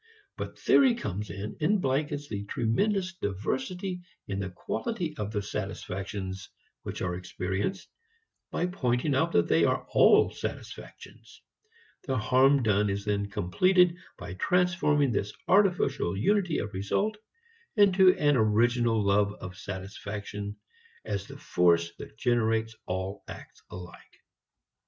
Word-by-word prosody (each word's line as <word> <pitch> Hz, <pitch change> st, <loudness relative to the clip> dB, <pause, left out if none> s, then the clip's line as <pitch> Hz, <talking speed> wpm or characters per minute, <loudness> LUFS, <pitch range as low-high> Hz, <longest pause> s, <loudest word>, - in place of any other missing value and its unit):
But -, -, -6 dB
theory 260 Hz, -4 st, +5 dB
comes 105 Hz, -, -4 dB
in 100 Hz, +2 st, -6 dB
and 200 Hz, +7 st, +3 dB
blankets 145 Hz, 0 st, -1 dB
the 100 Hz, -6 st, -4 dB
tremendous 185 Hz, -, 0 dB
diversity 155 Hz, -, -3 dB, 0.3 s
in 100 Hz, -1 st, -3 dB
the 95 Hz, -1 st, -3 dB
quality 180 Hz, -, -4 dB
of 105 Hz, -4 st, -3 dB
the 105 Hz, -2 st, -2 dB
satisfactions 95 Hz, -1 st, -5 dB, 0.3 s
which -, -, -5 dB
are 90 Hz, -1 st, -1 dB
experienced 95 Hz, -, -3 dB, 0.6 s
by -, -, -1 dB
pointing 140 Hz, -5 st, 0 dB
out 160 Hz, +5 st, +2 dB
that -, -, +3 dB
they -, -, +3 dB
are -, -, +1 dB
all -, -, +6 dB
satisfactions. -, -, -9 dB, 0.6 s
The 130 Hz, -1 st, 0 dB
harm 130 Hz, +4 st, +4 dB
done 105 Hz, -1 st, +2 dB
is 100 Hz, +1 st, -3 dB
then 100 Hz, -1 st, -1 dB
completed 175 Hz, -, +3 dB, 0.2 s
by 90 Hz, 0 st, -7 dB
transforming 165 Hz, -, +2 dB
this 100 Hz, -1 st, -2 dB
artificial 180 Hz, -, +2 dB
unity 180 Hz, -, +2 dB
of 105 Hz, -, -4 dB
result 150 Hz, -, -1 dB, 0.6 s
into 190 Hz, -3 st, +6 dB
an 145 Hz, -2 st, +3 dB
original 115 Hz, 0 st, +2 dB
love 100 Hz, +1 st, +3 dB
of 95 Hz, 0 st, -9 dB
satisfaction 100 Hz, +2 st, -6 dB, 0.5 s
as 100 Hz, -2 st, -3 dB
the -, -, -10 dB
force 85 Hz, -1 st, +2 dB
that -, -, -10 dB
generates 115 Hz, -2 st, +1 dB
all 95 Hz, +2 st, -4 dB
acts -, -, -11 dB
alike. 90 Hz, -1 st, -11 dB
110 Hz, 130 wpm, -28 LUFS, -, 0.6 s, all